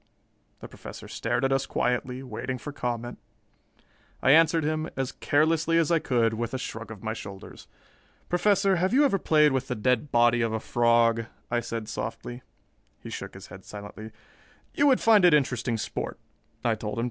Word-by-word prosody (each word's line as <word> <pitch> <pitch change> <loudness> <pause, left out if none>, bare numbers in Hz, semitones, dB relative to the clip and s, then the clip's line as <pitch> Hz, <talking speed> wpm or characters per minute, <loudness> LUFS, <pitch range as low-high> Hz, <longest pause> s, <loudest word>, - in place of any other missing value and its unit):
The - - -8
Professor - - -10
stared - - -1
at 135 - +1
us 135 0 +1
quietly, 125 +1 -1
waiting 130 +1 -4
for 145 - -7
comment. 120 -3 -4 1.0
I 130 - +5
answered 160 +1 +5
him, 155 +1 -1
as 135 0 -1
carelessly 160 +2 +1
as 165 0 +2
I 165 - +4
could, 115 -6 +1
with 115 +2 -3
a - - 0
shrug 115 -3 -6
of 105 -4 -10
my 110 0 -2
shoulders. 100 -3 -10 0.6
"Professor, 195 +1 +2
have 185 +7 +1
you 290 +2 +6
ever 200 -8 +2
played 150 -3 +4
with 130 0 -1
the 125 - -2
dead 125 +5 0
body 120 0 +4
of 115 -1 0
a 110 - -1
frog?" 115 0 +2 0.3
I 120 - +2
said 115 -2 -5
softly. 120 +2 -5 0.6
He - - -8
shook - - -7
his 95 0 -10
head 95 +1 -11
silently. 105 +2 -9 0.6
"You 290 - +3
would 265 -3 +4
find 220 -4 +5
it 175 -3 +7
interesting 125 -4 0
sport," - - -4 0.5
I 115 - +3
told 105 -1 -5
him. - - -1
125 Hz, 180 wpm, -27 LUFS, 115-155 Hz, 1.0 s, it